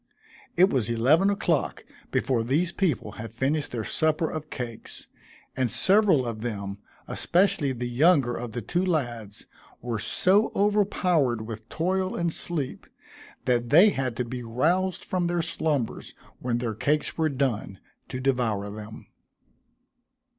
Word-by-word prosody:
It 185 +3 +5
was 120 -5 0
eleven 140 - +3
o'clock 175 -7 -1 0.2
before 125 -4 0
these 155 +9 +1
people 160 - -1
had 115 -2 -7
finished 140 +6 -1
their 115 -2 -3
supper 155 +6 +1
of 155 -1 -6
cakes, 120 -4 -7 0.5
and 130 -2 0
several 190 - +4
of 115 -2 -5
them, 100 -4 -4 0.3
especially 180 -5 +2
the 125 -1 -4
younger 135 0 +3
of 120 -2 -6
the 120 - -4
two 175 - -1
lads, 120 - -3 0.3
were 115 -2 -3
so 190 - +3
overpowered 180 - +1
with 110 0 -8
toil 185 +3 -1
and 170 -1 0
sleep, 150 -7 -3 0.6
that 120 -1 +1
they 175 +9 +7
had 130 -7 -3
to 125 - -1
be 125 +1 -5
roused 165 +11 0
from 180 -2 -1
their 175 -1 0
slumbers 150 -7 -2 0.2
when 120 -1 -1
their 120 -2 -2
cakes 150 +8 0
were 160 -1 +1
done, 130 -8 -2 0.3
to 125 - -4
devour 120 -6 0
them. 110 +1 -9
135 Hz, 140 wpm, -26 LUFS, 115-170 Hz, 0.6 s, they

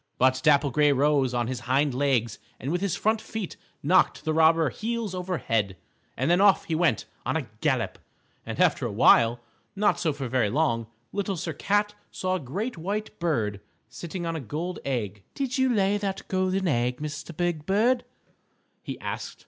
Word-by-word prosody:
But 130 0 +3
Dapple 145 -2 +4
Gray 150 +3 +4
rose 140 -1 +3
on 120 -1 0
his 125 +1 -3
hind 140 +1 +3
legs 125 -4 0 0.2
and 135 +6 -3
with 175 +1 0
his 195 -4 0
front 220 +1 +1
feet 220 -4 -5 0.3
knocked 180 +5 +3
the 155 - +1
robber 160 -2 +4
heels 225 - -3
over 180 -1 -2
head, 105 -7 -1 0.4
and 130 +7 +1
then 175 +2 +4
off 200 -1 +5
he 165 - -3
went 160 -8 +2 0.2
on - - 0
a - - -4
gallop. - - 0 0.4
And - - -6
after - - +3
a - - -5
while, 120 0 +5 0.3
not 205 +1 +2
so 165 - +1
very 130 -5 0
long, 115 -4 +1 0.2
Little 200 -2 -2
Sir 165 -1 -3
Cat 205 +6 +1 0.2
saw 185 0 -2
a 185 - 0
great 190 - -4
white 210 +5 -4
bird 110 - -1 0.3
sitting 170 +7 -6
on 165 0 -2
a - - -2
gold 155 - -4
egg. 105 -7 -2
"Did 265 -2 -2
you 260 -1 +3
lay 205 -2 +2
that 195 -1 -4
golden 185 0 0
egg, 125 -4 0
Mr. 150 +2 -6
Big 175 -4 -1
Bird?" 235 +6 +3 0.8
he - - -6
asked. - - -5
160 Hz, 180 wpm, -26 LUFS, 130-195 Hz, 0.8 s, off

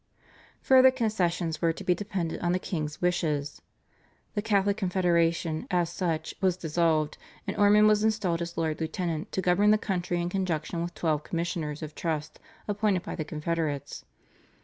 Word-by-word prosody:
Further 260 0 +7
concessions 180 -10 -1
were 165 -1 +2
to - - -8
be 180 - +3
dependent 185 -3 -3
on 175 0 +1
the - - +2
king's 155 -3 -4
wishes. 150 -5 0 0.7
The 205 - -1
Catholic 200 -2 +2
Confederation 170 -4 +1
as 175 -2 +1
such 165 -3 -2
was 185 -2 +2
dissolved, 160 -2 0 0.3
and - - -3
Ormond 205 +1 +5
was 215 0 +4
installed 205 -6 +1
as 170 0 -5
Lord 160 -1 -1
Lieutenant 160 0 -3
to 190 - -2
govern 190 +4 +4
the 215 - +6
country 180 -4 -2
in 175 0 -1
conjunction 175 -3 -2
with 175 +1 -4
twelve 155 -3 0
Commissioners 165 -3 -3
of 155 -1 -6
Trust 155 -3 -3 0.3
appointed 205 -3 +1
by - - -5
the 155 - -3
Confederates. 150 -2 -3
175 Hz, 160 wpm, -28 LUFS, 160-195 Hz, 0.7 s, Further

